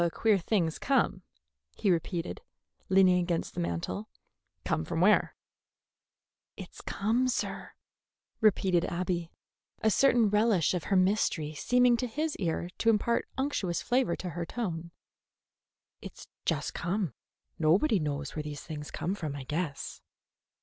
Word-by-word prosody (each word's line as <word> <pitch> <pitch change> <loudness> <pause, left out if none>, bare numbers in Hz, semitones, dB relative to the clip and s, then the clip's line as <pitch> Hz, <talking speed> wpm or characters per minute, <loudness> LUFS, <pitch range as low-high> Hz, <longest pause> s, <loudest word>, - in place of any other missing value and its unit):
"A 170 - +2
queer 210 +3 +2
thing's 170 -3 0
come," 275 0 +1 0.6
he 205 -4 +2
repeated, 170 0 -2 0.5
leaning 185 -1 +5
against 175 -1 -1
the - - -5
mantel. 85 +4 -3 0.6
"Come 80 - 0
from 120 - -3
where?" 205 +4 +4 1.2
"It's - - -10
come, 230 +6 0
sir," 255 - -3 0.7
repeated 185 -5 +3
Abby, 175 -1 -2 0.5
a 220 - +4
certain 240 -2 +4
relish 210 -6 +3
of 180 -3 -2
her 195 - +1
mystery 185 -5 +2
seeming 245 - +3
to 250 - -2
his 300 +6 -2
ear 175 -1 -2
to 230 - +3
impart 225 +2 +2
an 265 - +1
unctuous 190 -11 -1
flavor 245 -8 +1
to 180 - -5
her 170 0 -3
tone. 170 -4 -4 1.1
"It's - - -10 0.2
just - - -1
come. 180 - -2 0.5
Nobody 185 - +3
knows 145 -2 -3
where 155 - -2
things 150 0 -7
come 180 - -2
from, 155 -8 -4
I 140 - -6
guess." 150 +1 -4
180 Hz, 135 wpm, -30 LUFS, 160-220 Hz, 1.2 s, leaning